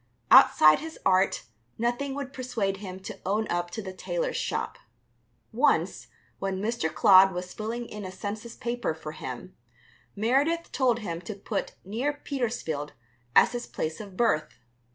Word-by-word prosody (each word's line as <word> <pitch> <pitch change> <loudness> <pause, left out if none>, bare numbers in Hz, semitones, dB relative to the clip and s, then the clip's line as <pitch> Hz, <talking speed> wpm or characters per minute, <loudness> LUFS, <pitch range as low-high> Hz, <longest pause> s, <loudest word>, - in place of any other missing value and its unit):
Outside 155 0 +8
his 320 +1 -8
art, 185 +1 +3 0.3
nothing 245 +4 -1
would 280 -1 -5
persuade 230 -7 -2
him 190 -2 -7
to 195 +1 -8
own 210 +3 0
up 175 0 -1
to 210 +5 -6
the 190 -1 -6
tailor's - - -2
shop. - - -2 0.7
Once, - - +2 0.3
when 195 -1 -2
Mr. 215 -5 -1
Clodd 190 0 +7
was 180 0 -5
filling 230 +3 -4
in 210 -2 -8
a 185 - -6
census 210 +4 -6
paper 240 0 -2
for - - -7
him, - - -7 0.6
Meredith 275 +11 +1
told 245 -3 +2
him 170 -5 -4
to 200 +4 -6
put 200 +1 -4
"near 240 +9 -1
Petersfield" 235 - -3 0.4
as - - +7
his 240 -1 -4
place 160 +4 -4
of 195 -3 -11
birth. 155 -10 +1
215 Hz, 155 wpm, -27 LUFS, 185-245 Hz, 0.7 s, Outside